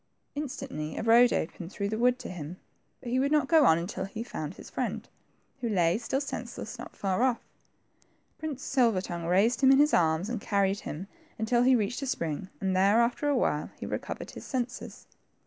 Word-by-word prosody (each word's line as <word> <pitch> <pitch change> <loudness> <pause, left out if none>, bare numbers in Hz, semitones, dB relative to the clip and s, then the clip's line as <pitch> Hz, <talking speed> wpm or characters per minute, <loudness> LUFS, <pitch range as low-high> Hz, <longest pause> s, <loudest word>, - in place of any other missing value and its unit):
'' - - -47
Instantly 255 - -5
a - - -2
road 235 +2 +6
opened 170 +2 -3
through 200 -1 -2
the 220 - -2
wood 250 +1 +4
to - - -8
him, 175 -1 -7 0.4
but 245 - -6
he 255 - +2
would 280 +2 +1
not 300 -3 +3
go 320 -2 +6
on 160 - +6
unfil 185 +2 -4
he 215 +3 -5
had - - -16
found 155 +2 -4
his - - -11
friend, - - -3 0.5
who 235 - -2
lay, 175 -5 +3
still 265 +3 -1
senseless, 280 - -6
not - - -9
far 195 +2 -1
off. 255 -2 +2 1.0
Prince 300 -4 -5
Silver 235 -8 +2
tongue 170 -2 -5
raised 200 +9 +3
him 265 -1 +7
in 270 - +7
his 295 +2 +4
arms 160 +2 +3
and 235 -2 -3
carried 200 -1 +1
him 170 0 -6 0.3
until 230 +2 +2
he 255 +1 +5
reached 230 +4 -1
a 275 - -3
spring, 170 - -2
and 190 -1 0
there, 200 +4 +4
after 245 +5 +1
a 285 - +2
while, 150 -10 0
he - - -5
recovered - - -5
his - - -9
senses. 245 -2 -4
225 Hz, 210 wpm, -29 LUFS, 185-255 Hz, 1.0 s, him